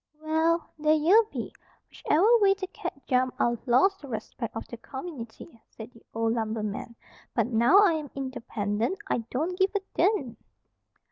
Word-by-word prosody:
"Well, 320 +2 0
there 305 +1 +4
ye 320 +6 +4 0.2
be. - - -5 0.3
Whichever 425 +10 +3
way 395 -2 +4
the 390 -1 -4
cat 320 -6 -7
jumped, 255 -1 0
I'd 235 -1 +1
lost 385 +12 +3
the 285 - -9
respect 230 -1 -6
of 225 - -5
the 235 - -8
community," 265 -2 -9
said 225 +1 -10
the 230 - -19
old 225 0 0
lumberman. 220 0 -3 0.4
"But 230 - +2
now 235 - +5
I 395 -5 +5
am 305 -3 -4
independent, 235 - -2
I - - +1
don't 320 +8 -2
give 380 +2 +2
a - - +3 0.2
dern!" 325 - +1
265 Hz, 160 wpm, -27 LUFS, 230-335 Hz, 0.4 s, now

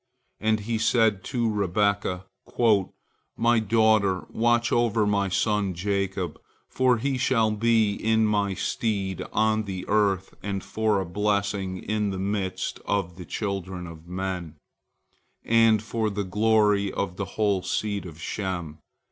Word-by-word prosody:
And 110 0 +1
he 110 +1 -2
said 110 -2 +3
unto 120 +4 -2
Rebekah, 100 -2 0 1.1
"My 115 0 +3
daughter, 110 -3 +2
watch 120 +1 +2
over 115 -2 +2
my 100 -1 +1
son 100 -1 0
Jacob, 95 -1 -2 0.3
for 130 -2 +2
he 130 +3 -1
shall 115 -4 +2
be 110 -1 +2
in 110 +1 +2
my 100 -2 +1
stead 100 -4 -2
on 110 0 +1
the 95 -2 -5
earth 100 -3 +1
and 100 -2 -3
for 110 -2 0
a 95 - -2
blessing 100 0 -1
in 105 0 -1
the 95 - -3
midst 95 -1 -2
of 95 -4 -2
the 90 - -8
children 95 -3 -4
of 85 -1 -11
men, 90 -3 -4 0.9
and 115 -2 +4
for 110 -1 -1
the 100 0 -2
glory 105 0 +2
of 95 -2 -3
the 100 - -2
whole 100 -3 +2
seed 100 +1 -2
of 80 -2 -11
Shem." 85 -5 -4
100 Hz, 140 wpm, -26 LUFS, 95-110 Hz, 1.1 s, and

